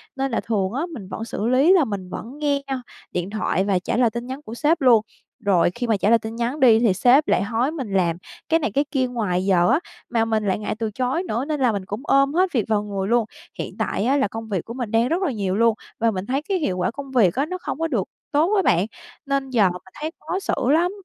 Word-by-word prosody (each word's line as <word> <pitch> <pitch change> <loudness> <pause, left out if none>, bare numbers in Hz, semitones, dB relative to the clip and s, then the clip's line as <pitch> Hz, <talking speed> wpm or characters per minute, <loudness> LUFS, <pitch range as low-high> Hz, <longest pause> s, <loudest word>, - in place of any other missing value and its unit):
Nên 270 -1 -1
là - - +1
thường 200 -4 -1
á 295 +6 -1
mình 200 -9 -8
vẫn 225 - -5
xử 220 -1 -3
lý 265 +8 +4
là 335 -7 +4
mình 195 -4 -5
vẫn 255 +10 -7
nghe 285 -2 +1
nha 265 -2 -3 0.3
điện 180 +2 -2
thoại 205 -3 0
và 190 -3 +2
trả 180 - -2
lời 240 -2 +4
tin 235 +1 -5
nhắn 265 +2 -6
của 230 -6 -9
sếp 305 +5 +1
luôn. 240 -4 +6 0.4
Rồi 190 -5 +2
khi 245 0 -3
mà 220 - +2
trả 200 +2 +1
lời 230 - +5
tin 220 +1 -6
nhắn 240 +5 -2
đi 230 -4 +6
thì 225 -6 +3
sếp 250 +10 +4
lại - - +2
hối 235 +7 0
mình 260 -11 -5
làm 170 -3 +2 0.3
cái 325 0 +4
này, 225 - -1
cái 285 +6 +1
kia 260 -3 +1
ngoài 195 -7 -1
giờ 180 -3 +3
á 300 - +4 0.3
mà 230 -2 +1
mình 220 -2 0
lại 190 - +1
ngại 215 - -3
từ 220 -1 -2
chối 255 - -1
nữa, 250 -5 -2
nên 300 -2 -2
là 250 -3 +3
mình 200 -2 -4
cũng 205 +5 -5
ôm 275 0 +3
hết 365 +1 +2
việc 235 -6 +1
vào 210 -1 +1
người 200 -2 -3
luôn. 235 0 +2 0.3
Hiện - - -5
tại - - -1
á, 275 +3 +3
là 265 - +2
công 225 +1 -7
việc 190 -5 -2
của 230 - -7
mình 245 -4 -4
đang 230 +2 +3
rất 340 +6 0
là 340 -8 +1
nhiều 195 -4 -2
luôn 230 0 +3 0.2
và 230 0 +3
mình 185 -1 -4
thấy 265 +5 -1
cái 380 +5 -1
hiệu 190 - -1
quả 180 - 0
công 275 +2 -8
việc 220 -8 +3
á 275 +3 +1
nó 365 +3 -4
không 295 - -4
có 325 - 0
được 235 -11 0 0.3
tốt 315 +7 +2
á 390 - +4
bạn, 180 - +3 0.4
nên 275 -1 -1
giờ 220 -7 +4
mình 180 0 -7 0.2
thấy 315 +1 -2
khó 375 - -3
xử - - -2 0.2
lắm. 345 +4 +3
235 Hz, 275 wpm, -22 LUFS, 205-275 Hz, 0.4 s, luôn